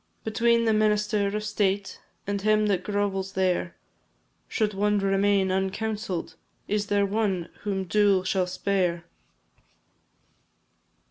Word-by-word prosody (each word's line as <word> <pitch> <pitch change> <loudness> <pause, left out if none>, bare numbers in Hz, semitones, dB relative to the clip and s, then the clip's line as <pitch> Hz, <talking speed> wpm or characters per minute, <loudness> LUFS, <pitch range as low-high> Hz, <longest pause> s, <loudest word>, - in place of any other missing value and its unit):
Between 230 +1 +2
the 220 - +3
minister 210 -1 +2
of 210 +1 -2
state 200 -2 -1 0.2
And 200 0 -2
him 215 +1 +3
that 195 -3 0
grovels 195 -1 -2
there, 185 -2 0 0.7
Should 215 -2 -1
one 210 +1 +1
remain 195 0 +2
uncounselled, 190 -1 -2 0.3
Is 205 0 -1
there 205 0 +2
one 195 -4 -1
whom 195 -2 -2
dool 200 0 +3
shall 185 -1 0
spare? 180 -2 -1
200 Hz, 115 wpm, -26 LUFS, 190-210 Hz, 0.7 s, the